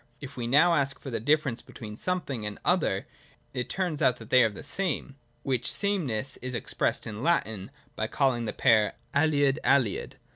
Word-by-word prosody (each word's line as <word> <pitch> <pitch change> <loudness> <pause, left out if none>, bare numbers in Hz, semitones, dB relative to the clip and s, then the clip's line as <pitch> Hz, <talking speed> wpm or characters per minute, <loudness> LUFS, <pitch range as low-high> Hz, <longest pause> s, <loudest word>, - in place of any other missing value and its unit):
If 140 0 -9
we 120 -2 -3
now 150 +7 +5
ask 140 -3 +1
for 135 - -7
the 115 - -1
difference 145 0 +1
between 105 -2 -9
something 145 -6 -3
and 105 0 -4
an - - -21
other, - - +1 0.5
it 125 0 -3
turns 180 -6 -2
out 125 -1 +3
that 115 -2 -13
they 130 - +7
are 115 - +4
the 105 - -10
same: 175 -7 -2 0.3
which 130 -3 0
sameness 140 - 0
is 125 0 -5
expressed 120 - -1
in 105 0 -6
Latin 110 - 0 0.3
by - - -1
calling 125 -4 +1
the - - -2
pair 110 -2 +3 0.2
aliud—aliud. 140 -5 +2
130 Hz, 180 wpm, -28 LUFS, 115-150 Hz, 0.5 s, they